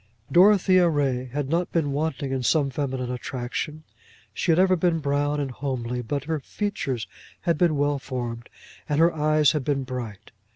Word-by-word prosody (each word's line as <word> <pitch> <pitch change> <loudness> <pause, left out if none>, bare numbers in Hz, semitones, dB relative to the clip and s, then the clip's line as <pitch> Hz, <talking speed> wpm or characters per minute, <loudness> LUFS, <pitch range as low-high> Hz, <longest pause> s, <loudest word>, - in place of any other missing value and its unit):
Dorothea 185 -1 +5
Ray 135 -5 0
had 135 +2 -3
not 170 +4 0
been 155 -4 0
wanting 145 -2 -2
in 135 -1 -1
some 140 +2 +2
feminine 130 -2 -3
attraction. 130 +5 -4 0.5
She 170 - 0
had 160 - +3
ever 185 0 +5
been 170 -1 +1
brown 145 0 0
and 140 -2 -2
homely, 125 -2 -3
but 140 +4 -3
her 160 0 -2
features 135 - -3 0.4
had 170 - +1
been 155 -1 +2
well 145 0 +1
formed, 120 -3 -5 0.4
and 150 0 +1
her 170 +1 +5
eyes 155 -1 +3
had 150 -4 -2
been 135 0 0
bright. 125 -6 -7
145 Hz, 170 wpm, -25 LUFS, 130-160 Hz, 0.5 s, Dorothea